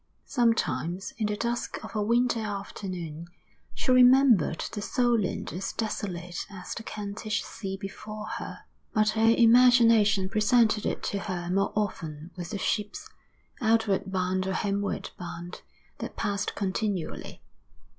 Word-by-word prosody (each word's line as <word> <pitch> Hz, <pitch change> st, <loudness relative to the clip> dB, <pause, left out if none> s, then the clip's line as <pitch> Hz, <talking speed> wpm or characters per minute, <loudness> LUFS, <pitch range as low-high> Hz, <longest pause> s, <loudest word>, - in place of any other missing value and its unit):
Sometimes, 195 Hz, -, 0 dB
in 215 Hz, -, +1 dB
the 210 Hz, 0 st, -2 dB
dusk 235 Hz, +2 st, -2 dB
of -, -, -10 dB
a 210 Hz, -, +1 dB
winter 235 Hz, +2 st, +2 dB
afternoon, 185 Hz, -6 st, -5 dB, 0.5 s
she 255 Hz, -, 0 dB
remembered 250 Hz, -, +6 dB
the 210 Hz, -, -4 dB
Solent 235 Hz, -3 st, 0 dB
as 190 Hz, +3 st, -4 dB
desolate 180 Hz, -5 st, -4 dB
as 190 Hz, -2 st, -7 dB
the -, -, -6 dB
Kentish 215 Hz, 0 st, -4 dB
sea 195 Hz, -2 st, -6 dB
before 215 Hz, +2 st, -7 dB
her; -, -, -7 dB, 0.3 s
but 215 Hz, 0 st, +4 dB
her 225 Hz, +1 st, +4 dB
imagination 230 Hz, -4 st, +6 dB
presented 215 Hz, +1 st, +3 dB
it -, -, -3 dB
to 200 Hz, -, -1 dB
her 180 Hz, -4 st, -4 dB
more 195 Hz, +1 st, +1 dB
often 165 Hz, -6 st, -3 dB
with 175 Hz, -2 st, -6 dB
the 210 Hz, -, -3 dB
ships, 205 Hz, +1 st, -2 dB, 0.5 s
outward 220 Hz, -4 st, +2 dB
bound 185 Hz, 0 st, 0 dB
or 190 Hz, -, -1 dB
homeward 200 Hz, -1 st, -2 dB
bound, 175 Hz, 0 st, -7 dB, 0.4 s
that -, -, -6 dB
passed 200 Hz, 0 st, -1 dB
continually. 195 Hz, -2 st, -3 dB
205 Hz, 135 wpm, -28 LUFS, 185-225 Hz, 0.5 s, remembered